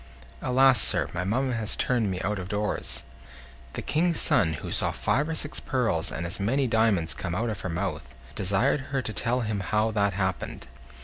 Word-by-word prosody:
"Alas! 130 -2 +5
sir, - - +3
my 90 +1 -2
mamma 125 +7 0
has 110 -3 0
turned 120 -5 +1
me 90 -1 -2
out 105 0 -1
of 90 - -5
doors." 105 +1 -2 0.7
The - - -4
King's 165 +1 +1
son, 80 -5 +3
who 75 - -6
saw - - +1
five 145 +5 0
or 160 - -1
six 145 -1 -2
pearls 115 - 0
and 85 - -4
as 85 - -2
many 130 +8 +1
diamonds 110 -8 +2
come 85 -2 -4
out 115 +4 0
of 105 - -5
her 95 - -3
mouth, 85 -7 -4 0.2
desired 100 - +1
her 135 -1 -1
to 110 - -4
tell 125 +4 0
him 110 -3 -2
how 105 +3 +1
that 100 -2 +1
happened. 95 -1 -3
105 Hz, 195 wpm, -27 LUFS, 95-125 Hz, 0.7 s, Alas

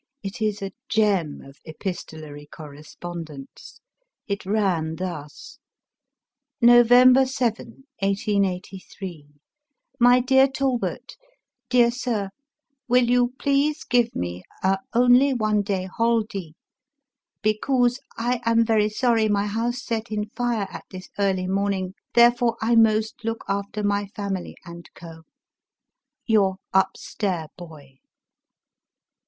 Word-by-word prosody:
It 195 +3 -6
is 210 -2 -1
a 195 - -4 0.2
gem 200 -8 +1
of 135 +1 -16
epistolary 155 -3 -7
correspondence. 155 0 -10 0.4
It 200 -2 -4
ran 185 -7 0
thus: 160 -5 -7 0.3
— 265 -3 -64
" 275 +1 -64
November 245 +2 +7
7, 255 0 -3 0.2
1883. 195 -4 -3 0.4
" 280 -3 -47
My 250 0 +6
Deab 265 +1 +3
Talbot, 265 -3 -2 0.2
" - - -61
Deab 240 -1 +4
Sib, 230 -6 -2 0.3
— 280 -4 -53
^Will 250 -1 +4
you 245 +1 +2
please 285 +2 +1
give 240 -1 +1
me 90 0 -4 0.2
a 190 0 +2 0.2
only 250 +3 +5
one 215 -3 +1
day 195 -2 -2
Holddy 215 -5 -1 0.5
— 275 -2 -62
becouse 245 +3 +1 0.2
I 240 +1 -1
am 230 0 +3
very 215 -2 +2
sorry 225 -1 +1
my 205 0 +1
house 235 +4 -2
set 225 -1 -3
in 210 0 -3
fire 240 -3 -1
at - - -9
this 185 -1 -10
early 190 -2 +1
morn 200 +2 0
ing 185 -1 -4 0.2
therefore 240 0 +4
I 225 +2 +1
most 220 -1 +2
look 225 0 -4
after 200 +1 -3
my 205 0 0
family 200 -2 -5
and 170 -1 -11
Co* 165 -1 -12 0.5
" - - -56
YouB 200 -4 +3 0.2
UP 190 0 +2
STAiB 180 -7 -3
Boy." 150 -6 -13
215 Hz, 130 wpm, -23 LUFS, 185-240 Hz, 0.5 s, November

